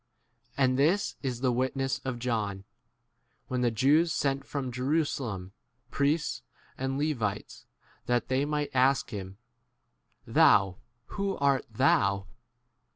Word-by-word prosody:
And 130 -1 +2
this 175 +8 +2
is 125 -3 -3
the 130 -2 +2
witness 130 +2 -1
of 130 -2 -3
John, 110 -5 -2 0.9
when 125 -1 -1
the 120 - +3
Jews 145 +9 +3
sent 140 -2 0
from 135 -3 -4
Jerusalem 125 - -1 0.4
priests 150 +3 0 0.3
and 135 +1 -2
Levites 120 -9 -3 0.4
that 120 0 +1
they 130 +1 +1
might 150 0 -2
ask 130 0 +2
him, 95 -2 -7 0.9
29 - - -12
Thou, 95 -1 +5 0.3
who 200 -1 -3
art 140 -2 +2
thou 100 -5 +2
130 Hz, 120 wpm, -29 LUFS, 115-140 Hz, 0.9 s, Thou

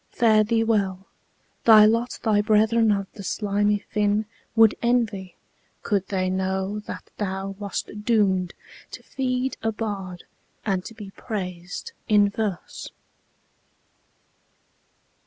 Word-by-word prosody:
Fare 220 -3 +4
thee 225 +1 +1
well! 195 -4 0 0.6
Thy 215 -2 +8
lot 230 +3 +1
thy 215 -3 +3
brethern 220 +1 +3
of 200 -1 0
the 210 - -9
slimy 205 +1 0
fin 210 +1 0 0.3
Would 225 -1 +6
envy, 225 -6 0 0.5
could 200 -3 0
they 185 -2 -1
know 190 +2 -1
that - - -8
thou 195 -1 -3
wast 200 -2 -4
doom'd 195 -6 +2 0.4
To - - -8
feed 255 0 -2
a 225 - 0
bard, 200 -5 -5 0.4
and 190 -3 0
to 225 - -9
be 205 -3 -9
prais'd 180 -6 -6 0.2
in 205 -1 +5
verse. 200 -5 -4
210 Hz, 120 wpm, -24 LUFS, 190-225 Hz, 0.6 s, Thy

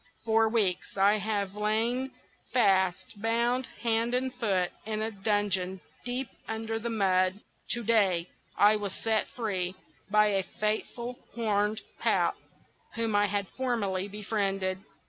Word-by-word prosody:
For 225 0 +4
weeks 200 -5 0
I 200 +2 +5
have 200 -2 -1
lain 225 +5 0 0.4
fast 190 -3 +2
bound, 235 +3 +1 0.2
hand 230 +1 +2
and 260 0 0
foot, 195 -8 +1
in 215 0 -3
a 220 +1 -1
dungeon 195 -2 0 0.2
deep 250 +1 -2 0.2
under 225 0 -2
the 235 +1 -3
mud. 190 -3 +2 0.3
To 235 - -3
day 195 -6 +3 0.3
I 210 +1 +6
was 200 -2 -4
set 220 -1 +1
free 190 -6 -2 0.3
by 210 +1 +5
a 195 -1 +2
faithful 225 +5 -3 0.2
Horned 210 -2 +1 0.2
Pout, - - +2 0.6
whom 225 -2 0
I 205 0 +4
had 200 0 -1
formerly 205 -7 -1
befriended. 195 -2 -1
210 Hz, 130 wpm, -29 LUFS, 195-230 Hz, 0.6 s, I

